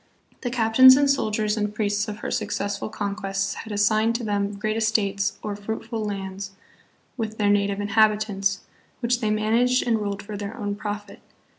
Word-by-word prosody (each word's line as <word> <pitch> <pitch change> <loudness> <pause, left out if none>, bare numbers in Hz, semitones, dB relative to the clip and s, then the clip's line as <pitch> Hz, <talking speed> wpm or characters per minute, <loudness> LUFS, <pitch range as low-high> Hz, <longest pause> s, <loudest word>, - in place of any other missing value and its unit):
The 245 - -2
captains 245 +2 +7
and 285 0 +3
soldiers 215 -6 +1
and 210 0 -2
priests 210 0 0
of 210 0 -6
her - - -4
successful 200 +1 -2
con 205 -2 -3
quests 195 -2 -2
had 225 - -8
assigned 215 +2 +2
to 235 - -2
them 205 -1 -1
great 215 +1 -2
estates 200 -3 0
or 210 -1 -3
fruitful 220 +2 -4
lands 195 -1 -5 0.6
with 220 -2 -4
their 205 -1 +3
native 200 0 +1
inhabitants, 205 -2 +2 0.4
which 240 0 +1
they 220 -3 0
managed 230 +4 +2
and 225 -2 +2
ruled 200 -1 -3
for 210 +1 -7
their 205 +3 -6
own 205 -3 -2
profit. 205 0 -6
210 Hz, 170 wpm, -24 LUFS, 200-220 Hz, 0.6 s, captains